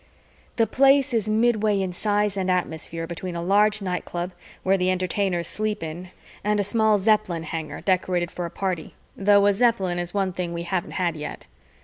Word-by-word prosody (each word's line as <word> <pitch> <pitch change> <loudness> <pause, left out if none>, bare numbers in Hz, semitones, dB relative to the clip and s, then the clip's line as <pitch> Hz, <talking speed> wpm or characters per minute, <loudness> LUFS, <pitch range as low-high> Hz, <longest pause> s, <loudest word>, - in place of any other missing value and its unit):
The 230 - +3
Place 270 +3 +4
is 220 -2 0
midway 215 -2 +2
in 190 -2 -2
size 205 +1 0
and 190 -1 -1
atmosphere 165 -2 -2
between 170 +1 -6
a 170 - -3
large 205 +3 +3
nightclub 180 -1 -3 0.3
where 190 +1 +3
the 185 -1 +1
Entertainers 185 -1 0
sleep 215 -2 -2
in 170 +3 -6 0.3
and 210 0 +1
a - - +2
small 220 +1 +3
Zeppelin 200 -5 +1
hangar 160 -1 -5
decorated 180 -2 0
for 175 -1 -4
a - - -8
party, 185 -3 -4 0.2
though 200 0 +4
a 205 - +5
Zeppelin 195 -6 +1
is 175 0 -2
one 195 -2 -1
thing 175 -1 -3
we 170 0 -4
haven't 175 0 -3
had 175 -3 0
yet. 150 -1 -7
190 Hz, 180 wpm, -24 LUFS, 175-210 Hz, 0.3 s, a